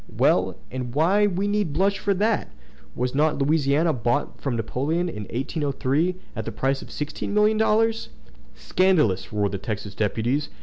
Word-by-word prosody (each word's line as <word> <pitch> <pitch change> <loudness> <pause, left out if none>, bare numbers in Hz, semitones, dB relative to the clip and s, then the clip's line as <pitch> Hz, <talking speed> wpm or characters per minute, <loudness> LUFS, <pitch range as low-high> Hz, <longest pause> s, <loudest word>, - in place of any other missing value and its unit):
"Well! - - +2
and 125 -1 -5
why 190 +7 +4
need 185 -3 -3
we 205 +2 +1
blush 190 +5 0
for 200 -1 +1
that? 215 +3 0 0.4
Was 125 +1 -1
not 150 +2 +2
Louisiana 150 +2 +2
bought 120 +4 -1
from 135 -4 -1
Napoleon 140 +10 -1
in 105 -11 -5
1803 140 +5 -1 0.2
at - - -3
the - - -5
price 135 +1 -1
of - - -11
sixteen 150 +7 -4
million 210 +1 +4
dollars?" 225 +1 +2 0.5
"Scandalous!" 155 - +1
roared 105 -2 0
the 100 - -3
Texas 105 -1 -5
deputies. 115 +8 -1
150 Hz, 160 wpm, -24 LUFS, 125-190 Hz, 0.5 s, why